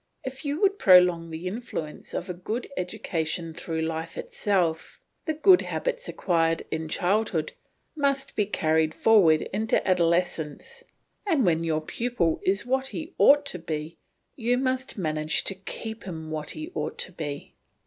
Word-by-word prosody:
If 265 Hz, +3 st, -6 dB
you 290 Hz, +1 st, -2 dB
would 400 Hz, 0 st, +3 dB
prolong 180 Hz, -3 st, +6 dB
the 160 Hz, +2 st, -7 dB
influence 180 Hz, -6 st, -5 dB
of 180 Hz, -, -3 dB
a 180 Hz, -, -3 dB
good 215 Hz, +8 st, -4 dB
education 165 Hz, -2 st, -3 dB
through 165 Hz, -1 st, -3 dB
life 160 Hz, 0 st, -4 dB
itself, 175 Hz, -6 st, -1 dB, 0.3 s
the 315 Hz, -, -1 dB
good 360 Hz, +4 st, +6 dB
habits -, -, -3 dB
acquired 165 Hz, -3 st, +1 dB
in 160 Hz, 0 st, -3 dB
childhood 180 Hz, -3 st, 0 dB, 0.4 s
must 280 Hz, -2 st, 0 dB
be 210 Hz, -2 st, +1 dB
carried 160 Hz, -4 st, +1 dB
forward 180 Hz, -9 st, +5 dB
into 220 Hz, +4 st, +1 dB
adolescence, 175 Hz, -, 0 dB, 0.4 s
and 305 Hz, -, +3 dB
when 165 Hz, -2 st, +2 dB
your 160 Hz, -1 st, 0 dB
pupil 180 Hz, -2 st, -1 dB
is 195 Hz, +3 st, +1 dB
what 265 Hz, +1 st, 0 dB
he 320 Hz, +5 st, -6 dB
ought 290 Hz, +1 st, +6 dB
to 180 Hz, -10 st, -5 dB
be 160 Hz, 0 st, -5 dB, 0.4 s
you 245 Hz, 0 st, +1 dB
must 260 Hz, -1 st, -1 dB
manage 155 Hz, -3 st, 0 dB
to -, -, -1 dB
keep 220 Hz, +3 st, -7 dB
him 160 Hz, -4 st, -6 dB
what 155 Hz, -1 st, -4 dB
he 315 Hz, +3 st, -6 dB
ought -, -, -3 dB
to -, -, -2 dB
be. 145 Hz, -5 st, -6 dB
180 Hz, 155 wpm, -26 LUFS, 160-250 Hz, 0.4 s, prolong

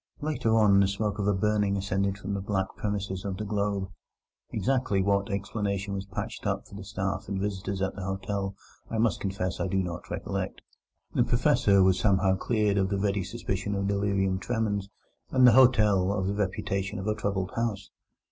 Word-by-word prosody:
Later 145 Hz, -7 st, 0 dB
on 100 Hz, -3 st, +6 dB
the 100 Hz, -, +5 dB
smoke 105 Hz, +1 st, -2 dB
of 100 Hz, -, 0 dB
a 105 Hz, -, +4 dB
burning 105 Hz, 0 st, +1 dB
ascended 100 Hz, 0 st, -1 dB
from 100 Hz, 0 st, -4 dB
the 100 Hz, -, -2 dB
back 95 Hz, -1 st, 0 dB
premises 100 Hz, -2 st, -3 dB
of 95 Hz, -2 st, -3 dB
the 105 Hz, -, -4 dB
Globe. 100 Hz, -2 st, -1 dB, 0.6 s
Exactly 130 Hz, -6 st, 0 dB
what 100 Hz, +1 st, +1 dB
explanation 100 Hz, 0 st, -2 dB
was 100 Hz, 0 st, -4 dB
patched 105 Hz, +2 st, -5 dB
up 95 Hz, 0 st, -1 dB
for -, -, -17 dB
the 100 Hz, 0 st, -7 dB
staff 95 Hz, 0 st, -3 dB
and 100 Hz, -1 st, -2 dB
visitors 95 Hz, -1 st, -2 dB
at 95 Hz, -, -1 dB
the 100 Hz, -, -7 dB
hotel 95 Hz, +1 st, -3 dB, 0.3 s
I 115 Hz, -, -2 dB
must 110 Hz, 0 st, +2 dB
confess 95 Hz, -2 st, -2 dB
I 90 Hz, -, 0 dB
do 95 Hz, -, -1 dB
not 90 Hz, -2 st, -3 dB
recollect. -, -, -4 dB, 0.5 s
The -, -, +3 dB
Professor 100 Hz, -1 st, +4 dB
was 95 Hz, 0 st, +4 dB
somehow 95 Hz, -1 st, +3 dB
cleared 105 Hz, 0 st, +1 dB
of 95 Hz, -1 st, +1 dB
the 100 Hz, -, 0 dB
ready 100 Hz, -1 st, 0 dB
suspicion 100 Hz, -1 st, -3 dB
of 100 Hz, 0 st, -1 dB
delirium 100 Hz, -2 st, +1 dB
tremens, 105 Hz, -3 st, -1 dB, 0.4 s
and 130 Hz, -1 st, +5 dB
the 125 Hz, -, +9 dB
hotel 105 Hz, -6 st, +5 dB
of 100 Hz, -2 st, -1 dB
the 100 Hz, -, 0 dB
reputation 100 Hz, 0 st, -2 dB
of 95 Hz, -, -5 dB
a 105 Hz, -, +1 dB
troubled 100 Hz, -3 st, -2 dB
house. 110 Hz, -4 st, -2 dB
100 Hz, 190 wpm, -28 LUFS, 95-105 Hz, 0.6 s, the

